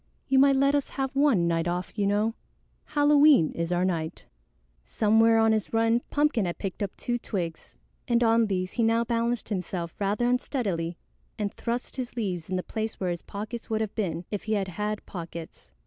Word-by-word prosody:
"You 265 -1 +4
might 275 0 +6
let 275 +1 +3
us 285 -1 0
have 270 0 -3
one 270 -12 +3
night 165 0 0
off, 180 +1 -3
you 205 -2 +1
know. 210 +3 +1 0.5
Halloween 290 - +5
is 170 +1 -3
our 180 +1 +2
night." 165 -4 -3 0.6
Somewhere 225 - +3
on 225 0 +4
his 220 0 -1
run, 225 +1 +3
Pumpkin 290 -8 +2
had 175 - -3
picked 195 -1 -5
up 200 -2 -3
two 240 0 -2
twigs, 170 -8 -5 0.3
and 240 0 +3
on 225 0 +4
these 185 -1 -1
he 240 - -2
now 230 +1 +3
balanced 235 0 -1
himself 180 -4 -3
rather 205 +4 0
unsteadily 205 - -1 0.4
and 205 -2 -2
thrust 240 +3 -4
his 250 -2 -4
leaves 185 -8 -3
in 185 - -1
the 180 - -1
place 220 0 -4
where 185 -2 -1
his 175 - -4
pockets 215 +3 -7
would 220 0 0
have 215 -2 -2
been 175 -5 -2
if 205 - -4
he 220 - 0
had 195 -3 0
had 210 +4 -3
pockets. 170 -2 -8
215 Hz, 195 wpm, -27 LUFS, 180-235 Hz, 0.6 s, might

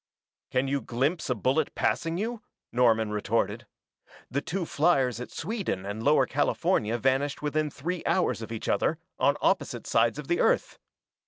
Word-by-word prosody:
"Can 130 +1 +1
you 140 0 0
glimpse 135 +10 -1
a 125 - +2
bullet 130 +8 0
passing 165 0 0
you?" 225 +3 -3 0.3
Norman 115 -3 +3
retorted. 105 -1 -1 0.6
"The 140 +3 0
two 175 +3 -3
fliers 135 -8 +2
at - - -6
Sweden 195 - -3
and 100 +2 -4
Lower 140 +1 +4
California 135 - +1
vanished 135 +4 0
within 150 +1 0
three 170 +5 -4
hours 180 -9 +1
of 110 - -7
each 115 - -5
other, - - +1 0.2
on - - +3
opposite - - +1
sides 115 +3 +2
of 150 -2 -6
the 175 - +1
Earth. - - +1
140 Hz, 160 wpm, -28 LUFS, 120-165 Hz, 0.6 s, Lower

